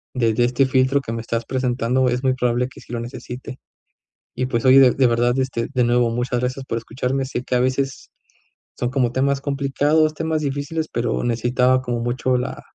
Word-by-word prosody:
desde 115 -2 +2
este 125 +3 +2
filtro 130 +1 +2
que 115 - -5
me 115 - -3
estás 115 0 -3
presentando 125 0 0
es 125 +2 -2
muy 130 -1 +3
probable 125 -1 0
que 130 - -14
sí - - -15
lo 120 - -2
necesite. 125 +2 -8 0.7
Y, 130 - -2
pues, 115 -3 -1
oye, 130 +1 +8
de 130 -2 +7
de 130 0 +3
verdad, 120 +2 +1
este, 125 -3 -1
de 125 -1 +2
nuevo, 120 0 +2
muchas 120 +1 -1
gracias 130 +2 -3
por 115 - -3
escucharme, 125 +4 -2
sé 130 -1 -4
que 125 - -2
a 125 - +3
veces 135 +1 -1 0.7
son, 120 - -1
como, 125 -2 0
temas 135 +1 +1
complicados, 145 +2 +1
temas 160 0 -2
difíciles, 145 +3 -3
pero 120 -1 -1
necesitaba, 125 +2 +2
como, 120 -2 -3
mucho 125 +1 0
la 125 - -4
125 Hz, 200 wpm, -21 LUFS, 120-135 Hz, 0.7 s, oye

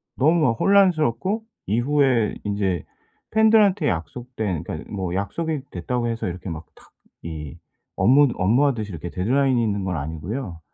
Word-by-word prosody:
너무 160 +5 +3
막 125 -6 +4
혼란스럽고 190 - +3 0.2
이후에 120 0 +2
인제 100 -5 -1 0.5
팬들한테 215 -6 +4
약속된 105 - -3
그러니까 - - -7
뭐 95 -3 -3
약속이 150 - -2
됐다고 120 +7 -2
해서 115 -1 -2
이렇게 90 +1 -6
막 80 0 -6
탁 - - -21 0.3
이 80 -1 -7 0.4
업무 140 +4 +5
업무하듯이 115 +2 +1
이렇게 85 0 -6
데드라인이 125 +7 +1
있는 100 -3 -1
건 90 -2 -2
아니고요. 85 - -5
115 Hz, 340 characters per minute, -23 LUFS, 90-145 Hz, 0.5 s, 업무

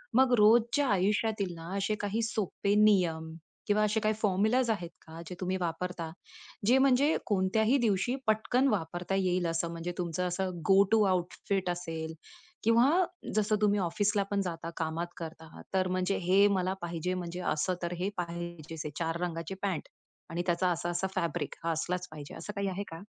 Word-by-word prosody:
मग 260 -1 +5
रोजच्या 235 +6 +5
आयुष्यातील 205 -1 +1
ना 165 +3 -6
असे 200 +2 0
काही 205 +2 -1
सोपे 205 -2 -1
नियम 165 -6 +2 0.3
किंवा 210 +1 +3
असे 210 +1 +2
काही 215 0 +1
फॉर्म्युलाज 220 +5 +2
आहेत 180 -6 -1
का 160 +1 -10
जे 180 - -7
तुम्ही 185 0 -1
वापरता? 175 0 -3 0.6
जे 245 +5 +5
म्हणजे 275 +3 +4
कोणत्याही 215 +5 +2
दिवशी 230 0 +1
पटकन 220 +5 +2
वापरता 180 -4 -1
येईल 185 -2 +1
असं. 165 0 -1
म्हणजे 170 +1 -4
तुमचं 180 +1 -1
असं 185 +1 -1 0.2
गो 195 0 +7
टू 225 -1 +5
आउटफिट 185 +1 -1
असेल 165 -2 -4 0.5
किंवा 230 +4 +5 0.5
जसं 215 0 +2
तुम्ही 205 -1 +3
ऑफिसला 200 +3 +1
पण 200 0 +2
जाता, 165 -3 -4
कामात 165 +1 -2
करता. 160 -1 -9
तर 185 -1 +2
म्हणजे 185 +1 0
हे 195 +2 +6
मला 185 0 0
पाहिजे 170 +1 -2
म्हणजे 180 -1 -4
असं 180 +5 0
तर 170 0 -2
हे 190 +2 0
पाहिजे. 170 -2 -5
हे - - -2
4 165 0 -1
रंगाची 165 0 -3
पॅंन्ट 190 -5 -2 0.4
आणि 170 +1 -2
त्याचा 180 +1 +2
असा-असा 175 +2 -1
फॅब्रिक 170 -5 -2
हा 165 - +1
असलाच 180 +3 -2
पाहिजे. 150 -2 -9
असं 210 - -7
काही 200 -1 -1
आहे 190 +2 -3
का? 165 0 -8
185 Hz, 170 wpm, -30 LUFS, 170-210 Hz, 0.6 s, गो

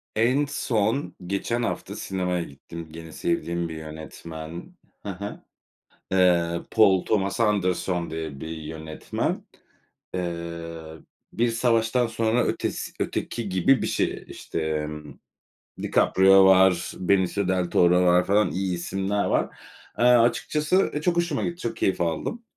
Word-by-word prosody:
En 125 +6 +3
son 125 -2 -1
geçen 115 +5 -1
hafta - - -3
sinemaya 90 -2 -2
gittim. 80 +4 -10
Gene 80 0 -9
sevdiğim 85 +1 -2
bir 80 - -6
yönetmen. 80 - -8 0.3
Ha 100 -1 -6
ha. 100 - -6 0.7
Eee, 85 -2 +3
Paul 100 -5 +4
Thomas 100 0 0
Anderson 95 -4 +1
diye 80 -4 -5
bir 80 - -6
yönetmen. 80 0 -4 0.7
Eee, 85 -2 -5 0.4
"Bir 120 +1 +1
Savaştan 115 +1 +2
Sonra 115 +1 +1
Ötesi - - -2
Öteki" 115 -3 -3
gibi 95 +8 +3
bir - - 0
şey. - - -1
İşte, - - -5
emm, 75 -2 -4 0.7
DiCaprio 95 +1 +5
var, 95 -2 +5
Benicio 95 +1 +1
del 90 -2 0
Toro 90 +1 +4
var, 90 0 +4
falan. 105 +2 +3
İyi 95 0 -1
isimler 95 +3 -1
var. - - 0 0.4
Eee, 120 - +3
açıkçası, 145 +9 +3
e, 150 - -2
çok 170 +2 +1
hoşuma 170 -4 0
gitti. 170 - -2
Çok 115 - -3
keyif 95 - 0
aldım. 85 - -2
95 Hz, 130 wpm, -25 LUFS, 85-115 Hz, 0.7 s, DiCaprio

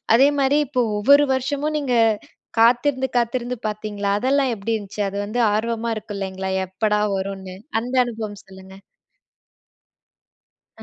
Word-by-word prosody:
அதே 265 +4 +6
மாரி 275 +2 +3
இப்போ 255 -2 0 0.2
ஒவ்வொரு 280 +7 +6
வருஷமும் 285 +4 -1
நீங்க 270 -4 -1 0.7
காத்திருந்து, 255 +3 +3
காத்திருந்து 245 +1 -1
பாத்தீங்களா? 210 -1 -3
அதெல்லாம் 270 +2 +2
எப்படி 205 +3 -4
இருந்துச்சு? 205 -1 -7
அது 200 - -6
வந்து 220 +4 -3
ஆர்வமா 230 +1 -1
இருக்கு 210 -1 -7
இல்லைங்களா? 190 -1 -4 0.2
எப்படா 210 +3 0 0.2
வரும்னு 190 -1 -5 0.2
அந்த 245 +3 -6
அனுபவம் 220 -4 -6
சொல்லுங்க? 190 0 -13 2.1
அ. - - -9
225 Hz, 130 wpm, -22 LUFS, 200-255 Hz, 2.1 s, அதே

